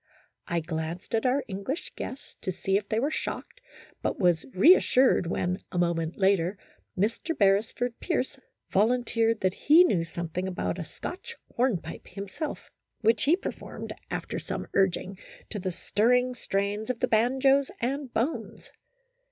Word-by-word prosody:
I 170 -1 0
glanced 160 +3 -5
at 225 +2 +2
our 265 +2 +2
English 200 - -4
guests 265 - -7
to 185 - -2
see 190 +1 -1
if 200 0 0
they 220 - +1
were 285 +5 0
shocked, - - -5 0.4
but - - -1
was 175 -4 +2
reassured 255 - +5
when, 180 +2 -1
a 180 - -4
moment 170 -1 0
later, 190 -1 +2 0.4
Mr. 225 - -1
Beresford 220 +4 +2
Pierce 300 -8 -1 0.4
volunteered 230 +1 +2
that 185 -2 +2
he 315 - +6
knew 190 - +2
some 170 0 -5
thing 180 +3 -2
about 185 0 -2
a 165 - -4
Scotch 355 - -7 0.2
hornpipe 210 -10 -1
himself, 200 - -6 0.3
which 225 -1 +3
he 310 +5 +5
performed, 390 - -6 0.2
after - - -3
some - - -4
urging, 190 0 +1 0.3
to 210 - -3
the 185 0 -2
stirring 250 +8 +2
strains 205 -1 -2
of 250 -2 -1
the - - +1
banjos 265 +5 +3
and 270 +2 -2
bones. 255 +9 -3
210 Hz, 150 wpm, -28 LUFS, 185-250 Hz, 0.4 s, he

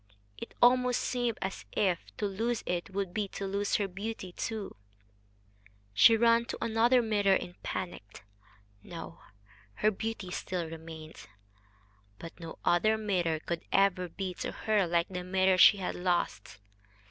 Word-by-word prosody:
It - - -9
almost 250 0 +5
seemed 245 -2 -1
as 190 0 -4
if 185 -4 +1 0.2
to 210 - -1
lose 225 +4 -1
it 175 +1 -2
would 195 -2 -3
be 210 -2 -1
to 195 - -6
lose 200 +1 -1
her 205 - +1
beauty 195 0 -6
too. 215 +2 -5 1.2
She 120 - +7
ran 230 +1 +4
to - - -5
another 230 +2 +3
mirror 205 -3 +3
in 175 - -4
panic. 105 - -6 0.6
No! 165 - -9 0.6
her 215 - +2
beauty 215 -2 -5
still 180 -1 -3
remained. 160 -6 -10 0.9
But 165 - -10
no 165 -1 -8
other 215 +6 +3
mirror 180 -7 0
could 170 0 -3
ever 195 -2 +2
be 185 +2 -4
to - - -3
her 210 -4 +1
like 170 0 +1
the 180 -1 -5
mirror 185 0 +2
she 205 - +8
had 190 - -3
lost. 175 - -2
195 Hz, 145 wpm, -30 LUFS, 175-220 Hz, 1.2 s, she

